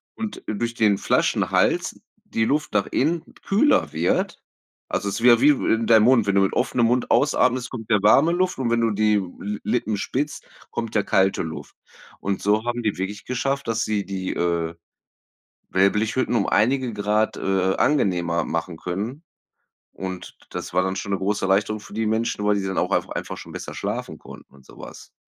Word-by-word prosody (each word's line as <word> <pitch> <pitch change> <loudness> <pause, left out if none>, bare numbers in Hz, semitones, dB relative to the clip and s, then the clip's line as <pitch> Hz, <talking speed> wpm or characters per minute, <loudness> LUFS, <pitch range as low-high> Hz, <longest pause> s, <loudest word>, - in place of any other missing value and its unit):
und, 220 -2 -6
äh, 110 - -2
durch 120 +2 -2
den 105 -4 +3
Flaschenhals - - +1 0.3
die 115 - 0
Luft 150 +2 -1
nach 105 -2 +1
innen 160 +5 0 0.2
kühler 220 +10 +3
wird, 80 +3 0 0.5
also, 100 - -1
es 100 +2 -3
wäre 120 -1 +6
wie 145 +4 +6
in 115 -5 +2
deinem 110 -1 +6
Mund 125 -4 +5
wenn 100 - +2
du 100 - +5
mit 95 - +1
offenem 120 -2 +1
Mund 125 +1 0
ausatmest, 130 -3 +2
kommt 115 -4 -8
ja 105 - +5
warme 135 +11 +5
Luft, 185 +1 0
und 120 -3 -1
wenn 120 0 +2
du 115 - +2
die 105 +1 +2 0.2
Li 105 +1 -4
Lippen 110 -3 -1
spitzt, 140 +8 -3 0.2
kommt 115 -2 -4
ja 105 - +3
kalte 95 -2 +2
Luft. 80 -3 -8 0.4
Und 100 -1 -2
so 105 +3 +1
haben 120 0 -2
die 105 - -1
wirklich 95 +2 -5
geschafft, 135 +2 -2
dass 115 0 0
sie 105 -2 -1
die, 95 -1 -4
äh, 85 -1 -1 1.0
Wellblechhütten 105 +6 +1
um 100 - +1
einige 125 +3 +2
Grad, 105 +1 0
äh, 95 -1 +1
angenehmer 90 - +1
machen 85 +1 -3
können, 110 - -5 0.7
und 95 -1 -7
d - - -22
das - - -6
war 90 +1 +3
dann 95 0 -2
schon 100 +1 -3
'ne 95 - -1
große 100 +1 -1
Erleichterung 100 +3 +1
für 105 -1 -13
die 110 +1 -1
Menschen, 110 -1 -1
weil 105 0 +3
die 100 - -1
dann 95 - -3
auch - - 0
einfach - - 0
einfach - - -5
schon - - -10
besser - - -7
schlafen - - -4
konnten - - -14
und 70 -1 -19
sowas, - - -12
105 Hz, 190 wpm, -23 LUFS, 95-120 Hz, 1.0 s, wäre